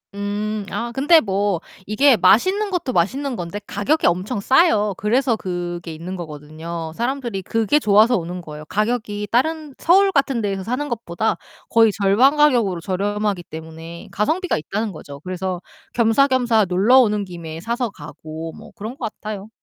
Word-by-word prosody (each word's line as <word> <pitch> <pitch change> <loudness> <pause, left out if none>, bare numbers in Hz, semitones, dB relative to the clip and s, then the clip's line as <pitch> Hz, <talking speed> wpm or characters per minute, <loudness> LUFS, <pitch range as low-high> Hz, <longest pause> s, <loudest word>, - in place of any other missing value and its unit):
음 205 +1 -3 0.2
아 235 0 -3
근데 295 +6 +5
뭐 195 -3 0 0.3
이게 255 +3 +4
맛있는 375 - +3
것도 325 -8 -1
맛있는 260 +10 0
건데 175 +4 -5
가격이 275 +11 +1
엄청 185 +6 0
싸요. 220 - +3
그래서 235 +3 +1
그게 175 -3 -5
있는 175 +4 -6
거거든요. 160 +1 -7
사람들이 240 -5 -2
그게 225 +8 +1
좋아서 215 +1 +4
오는 175 +1 -5
거예요. 150 -1 -9
가격이 210 +1 -2
다른 305 +3 0
서울 390 +3 +4
같은 275 -6 +1
데서 195 -2 -2
사는 255 +7 -2
것보다 220 -3 -2 0.3
거의 225 -2 +5
절반 205 +9 +4
가격으로 235 - +3
저렴하기 200 0 -1
때문에 160 +1 -10
가성비가 330 - 0
있다는 205 +7 -3
거죠. 145 -3 -10
그래서 185 0 -4 0.3
겸사겸사 240 -2 +3
놀러 210 +9 +5
오는 210 -4 +2
김에 165 -3 -8
사서 235 +3 -2
가고 155 0 -8
뭐 - - -13
그런 220 +5 -6
것 225 -4 -4
같아요. 210 -1 -6
210 Hz, 345 characters per minute, -21 LUFS, 175-250 Hz, 0.3 s, 근데